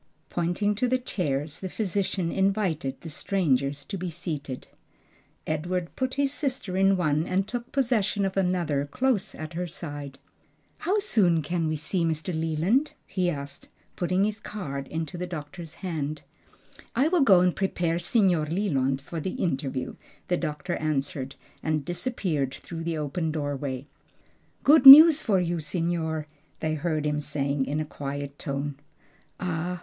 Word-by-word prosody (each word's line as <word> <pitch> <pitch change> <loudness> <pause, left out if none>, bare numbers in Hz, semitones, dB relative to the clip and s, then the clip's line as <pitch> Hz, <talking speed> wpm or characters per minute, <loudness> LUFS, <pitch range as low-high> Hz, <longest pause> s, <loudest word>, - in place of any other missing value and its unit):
Pointing 175 +4 0
to 240 +5 0
the 255 +1 +2
chairs, 150 - -2
the 190 - -5
physician 190 -3 -1
invited 190 -9 0
the - - -8
strangers 140 -5 0
to 195 - -5
be 180 0 -3
seated. 155 -6 -5 0.8
Edward 170 +3 -2
put 260 0 -2
his 280 -1 +1
sister 260 -11 -2
in 195 0 +4
one 155 -1 +1
and 190 +2 0
took 240 0 -5
possession 225 -7 +1
of 190 - -2
another 175 -7 0
close 240 - 0
at 155 +2 -7
her 175 +2 -3
side. 145 -5 -7 0.6
"How 380 +5 +1
soon 185 - +3
can 170 +1 -1
we 155 - 0
see 160 +4 -1
Mr. 165 +2 -1
Leland?" 165 - +1
he 185 -2 0
asked, 140 -3 -6 0.3
putting 185 +2 +1
his 215 +1 -1
card 140 -12 -5
into 160 +1 -4
the 180 - -3
doctor's 165 0 -7
hand. 155 -4 -3 0.7
"I 265 +5 +3
will 345 0 +3
go 195 -9 +6
and 180 -1 +2
prepare 175 -3 0
Signor 175 -4 +2
Leland 140 -7 0
for 165 +4 -6
the 185 +4 -3
interview," 135 -5 -2 0.3
the 180 - +2
doctor 165 +2 -3
answered, 140 -3 -2 0.3
and 155 -2 -1
disappeared 175 - -2
through 165 -1 -7
the 165 -1 -1
open 155 +2 -2
doorway. 145 -3 -3 0.8
"Good 285 -1 +7
news 310 +3 +12
for 200 -5 +2
you, 175 -1 -1
signor!" 160 0 -1 0.3
they 155 -1 -1
heard 155 -1 -1
him 150 0 0
say 145 -1 -2
in 140 +1 0
a 155 - -1
quiet 140 -1 -6
tone. 140 -1 -3 0.6
"Ah! 180 0 -2
170 Hz, 155 wpm, -27 LUFS, 150-195 Hz, 0.8 s, news